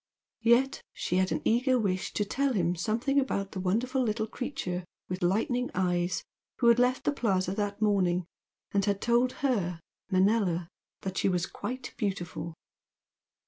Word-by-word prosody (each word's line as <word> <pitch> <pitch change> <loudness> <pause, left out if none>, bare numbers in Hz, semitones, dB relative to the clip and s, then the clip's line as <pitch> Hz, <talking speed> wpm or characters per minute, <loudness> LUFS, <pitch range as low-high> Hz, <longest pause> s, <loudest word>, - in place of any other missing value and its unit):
Yet 235 +4 +3
she 180 - -1
had 185 0 +2
an - - -1
eager 255 +3 +3
wish 190 -5 -1
to 210 - 0
tell 270 +5 0
him 175 -4 +1
something 230 - +1
about 200 -7 -1
the 190 - -5
wonderful 235 +8 +1
little 220 -2 0
creature 220 -7 -4 0.2
with 185 +1 -4
lightning 245 - +1
eyes 180 -1 0 0.3
who 235 - +4
had 235 +1 +5
left 250 +1 +2
the - - +2
Plaza 190 -9 0
that 205 +1 -2
morning 185 -4 +2 0.5
and 200 0 +2
had 200 -1 +1
told 240 +3 +2
her, 180 -9 0 0.3
Manella, 185 -3 +2 0.3
that 190 -1 -3
she - - +2
was 180 -1 +1
"quite 255 +6 -6
beautiful." 175 -6 -3
205 Hz, 155 wpm, -29 LUFS, 185-245 Hz, 0.5 s, had